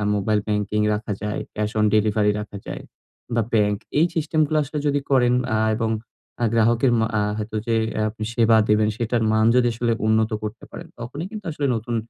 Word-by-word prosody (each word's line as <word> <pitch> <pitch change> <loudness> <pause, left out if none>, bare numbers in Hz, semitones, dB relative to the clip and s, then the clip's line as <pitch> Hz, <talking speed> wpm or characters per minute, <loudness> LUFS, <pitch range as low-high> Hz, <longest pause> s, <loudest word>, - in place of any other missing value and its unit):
mobile 105 +1 +1
banking 105 0 -1
রাখা 105 0 -3
যায়, 105 0 -2 0.2
cash 105 0 -1
on 105 - +4
delivery 105 -1 +2
রাখা 105 -1 -7
যায় - - -5 0.5
বা, 115 - +3
ব্যাংক 105 -2 +3 0.2
এই 165 - +5
সিস্টেমগুলো 155 -1 +1
আসলে 145 +2 -6
যদি 145 0 +2
করেন 125 -2 +4 0.2
আ - - +2 0.2
এবং 115 -1 0 0.5
আ - - +4
গ্রাহকের 115 +2 +3
মা 110 - +2
আ - - +1 0.2
হয়তো 110 0 -5
যে 115 - +2 0.3
আপনি 110 0 -7
সেবা 115 -1 +5
দিবেন, 105 0 +3
সেটার 115 0 0
মান 110 0 +3
যদি 125 -1 +4
আসলে 115 0 0
উন্নত 110 0 +2
করতে 105 +2 -6
পারেন, - - -9
তখনই 135 +8 -6
কিন্তু 210 -3 -8
আসলে 150 -2 -3
নতুন 115 +1 -3
110 Hz, 190 wpm, -22 LUFS, 105-120 Hz, 0.5 s, এই